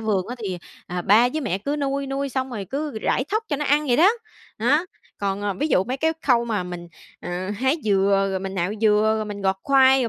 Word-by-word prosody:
vườn 205 -4 0
á 245 - -5
thì, 185 -4 -3 0.3
à, 180 0 -4
ba 220 +7 +5
với 310 +5 -3
mẹ 205 - -1
cứ 285 +9 -2
nuôi, 280 -1 -1
nuôi 275 +1 -2
xong 260 0 -3
rồi 215 -5 -4
cứ 280 - -4
rải 255 - 0
thóc 435 +3 0
cho 290 - 0
nó 295 - -2
ăn 295 +1 +2
vậy 245 -3 +3
đó, 345 +5 +6 0.5
đó. 290 +10 +2 0.3
Còn, 200 0 -2
ờ, 205 -1 -1
ví 295 +12 -1
dụ 185 - +3
mấy 255 +4 -3
cái 320 +4 +1
khâu 240 -3 +3
mà 215 -5 -1
mình, 175 -1 -7 0.3
à, 180 +2 -4
hái 265 +6 +1
dừa, 195 -1 +3
rồi 190 - -1
mình 195 0 -5
nạo 180 +1 -1
dừa, 215 0 +4
rồi 215 - -2
mình 205 -1 -6
gọt 190 0 +1
khoai, 265 -1 +5
rồi 235 - 0
225 Hz, 250 wpm, -23 LUFS, 195-275 Hz, 0.5 s, đó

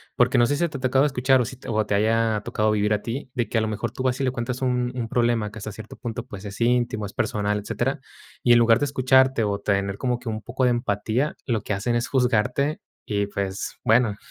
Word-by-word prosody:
porque 125 +1 +3
no 120 - +5
sé, 145 - +1
si 170 - +1
te 145 - -6
ha 130 - -10
tocado 130 +1 +3
escuchar, 130 -1 +3
o 120 - 0
si 130 +1 -8
te - - -13 0.3
haya 110 0 +2
tocado 110 0 +1
vivir 105 0 +1
a 105 - 0
ti, 125 +4 -5
de 120 -3 -1
que 115 - 0
a - - +3
lo 110 - 0
mejor 110 +1 -3
tú 125 - -7
vas 130 0 0
y - - +1
le 130 - +1
cuentas 125 +1 -4
un 125 -1 0
un 115 -2 -3
problema 120 -3 +1
que 105 - -11
hasta 105 +1 -6
cierto 110 0 -10
punto, 120 -1 -5
pues, 105 -3 -9
es 100 +3 -8
íntimo, 120 -3 +1
es - - -12
personal, 105 0 -1
etcétera. 105 - -2 0.4
Y 120 - +6
en 120 - +6
lugar 115 0 +5
de 145 - +1
escucharte, 130 -2 +3
o 100 -1 -1
tener 100 -1 -1
como 125 -2 0
que 125 - -6
un 110 0 -4
poco 130 +4 -3
de 125 - +4
empatía, 120 +4 -1
lo 115 -5 0
que 105 - -3
hacen 120 +4 -1
es 120 - 0
juzgarte 130 +3 +1 0.3
y, 100 -1 -1
pues, 100 -1 -4
bueno, 110 -2 +3
120 Hz, 250 wpm, -24 LUFS, 105-125 Hz, 0.4 s, Y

